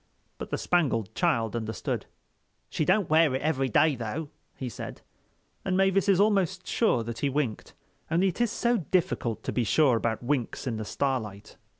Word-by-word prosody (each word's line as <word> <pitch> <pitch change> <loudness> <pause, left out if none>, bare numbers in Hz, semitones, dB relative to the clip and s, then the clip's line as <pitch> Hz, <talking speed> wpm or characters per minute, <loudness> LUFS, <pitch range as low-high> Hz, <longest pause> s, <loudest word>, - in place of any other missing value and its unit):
But - - -6
the - - -1
Spangled 135 - 0
Child 120 - +1
understood. 110 -4 -3 0.6
"She 155 - 0
don't 200 +2 +3
wear 155 -3 +4
it 130 - -2
every 135 -4 +1
day, 150 +4 +4
though," 125 +6 -4 0.3
he 130 - -5
said; 120 - -8 0.6
and 185 -1 0
Mavis 195 +1 +3
is 195 -2 +4
almost 195 -3 +2
sure 170 - +1
that 115 0 -6
he 140 - +1
winked. 135 -5 -3 0.3
Only 175 +4 +3
it 185 - -4
is 240 -3 +2
so 235 +1 +1
difficult 175 - -1
to - - -2
be 125 - 0
sure 130 +2 +3
about 115 0 -2
winks 130 0 -2
in 120 -4 -2
the 110 - -4
starlight. 110 -6 -3
145 Hz, 180 wpm, -27 LUFS, 115-185 Hz, 0.6 s, wear